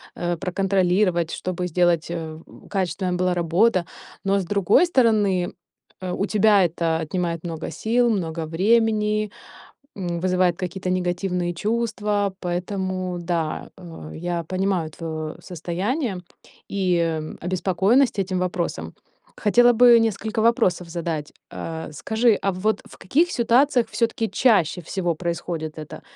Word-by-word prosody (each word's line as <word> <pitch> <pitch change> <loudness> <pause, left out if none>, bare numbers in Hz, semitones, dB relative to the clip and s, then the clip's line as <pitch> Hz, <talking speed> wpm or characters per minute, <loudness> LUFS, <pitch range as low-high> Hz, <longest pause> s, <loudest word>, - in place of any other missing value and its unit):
э, 175 -1 -2
проконтролировать, 185 -1 +1
чтобы 180 0 -3
сделать 175 -1 +2
э, 160 -2 -5 0.3
качественная 185 -1 -1
была 180 0 +1
работа, 175 +2 +2 0.4
но 195 0 +2
с 185 - -3
другой 200 - +3
стороны, 210 - +2 0.5
э, 180 -1 -3
у 195 - -1
тебя 210 -2 +4
это 165 -1 0
отнимает 170 +1 -2
много 165 -2 -5
сил, 240 +2 +1
много 165 -5 -2
времени, 215 +3 +2 0.7
м, 175 -3 -3
вызывает 180 -1 +2
какие-то 185 0 -3
негативные 180 -1 -1
чувства, 210 -1 -1
поэтому 185 0 -3
да, 170 -2 -2
э, 165 -4 -10
я 170 0 -3
понимаю 185 -2 -1
твоё 155 -1 -5
состояние 185 - -3 0.5
и 170 -5 0 0.2
обеспокоенность 190 +7 +2
этим 185 -1 -1
вопросом. 170 - -3 0.4
Хотела 240 +3 +5
бы 240 0 +7
несколько 220 0 -1
вопросов 220 -7 +2
задать. 165 -3 -4 0.2
А, 160 -1 -6
скажи, 220 +8 +2
а 195 - +1
вот 210 +4 0
в - - -15
каких 325 - +2
ситуациях 245 0 +3
всё-таки 230 -1 0
чаще 190 - +2
всего 175 0 -2
происходит 170 -2 -4
это: 155 -1 -8
185 Hz, 125 wpm, -23 LUFS, 170-210 Hz, 0.7 s, бы